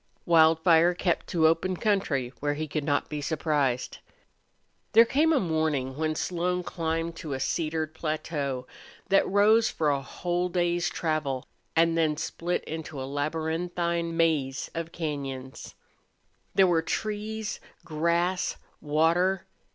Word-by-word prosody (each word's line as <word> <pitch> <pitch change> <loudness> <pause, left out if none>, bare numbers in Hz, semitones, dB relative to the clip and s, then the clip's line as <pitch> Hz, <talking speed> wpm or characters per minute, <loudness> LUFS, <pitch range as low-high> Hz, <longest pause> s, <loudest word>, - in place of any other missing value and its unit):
Wildfire 165 +1 +5
kept 175 -1 0
to 165 -2 +2
open 170 +3 +2
country 165 - 0
where 145 0 -1
he 155 +1 -3
could 150 0 -2
not 145 0 0
be 150 -1 -4
surprised. 145 -5 -1 0.9
There 230 +1 +8
came 300 +7 +2
a 300 - +4
morning 155 -6 -1
when 155 +1 -1
Slone 180 +2 -1
climbed 165 -1 -2
to 150 -4 -5
a - - -4
cedared 155 +2 -1
plateau 155 -5 -3 0.4
that 195 - +4
rose 215 +3 +4
for 150 -2 +1
a 140 -1 0
whole 175 +5 -2
day's 175 -1 +1
travel, 150 -5 -2 0.3
and 165 0 +4
then 155 -2 +1
split 170 +2 -2
into 160 -2 -6
a 130 - -3
labyrinthine 165 +4 -2
maze 150 -5 +1
of 165 0 -4
cañons. 135 -5 -5 0.8
There 195 - +6
were 170 -3 +3
trees, 215 +4 -3 0.3
grass, 170 +3 0 0.2
water. 170 +5 +2
165 Hz, 130 wpm, -27 LUFS, 150-175 Hz, 0.9 s, There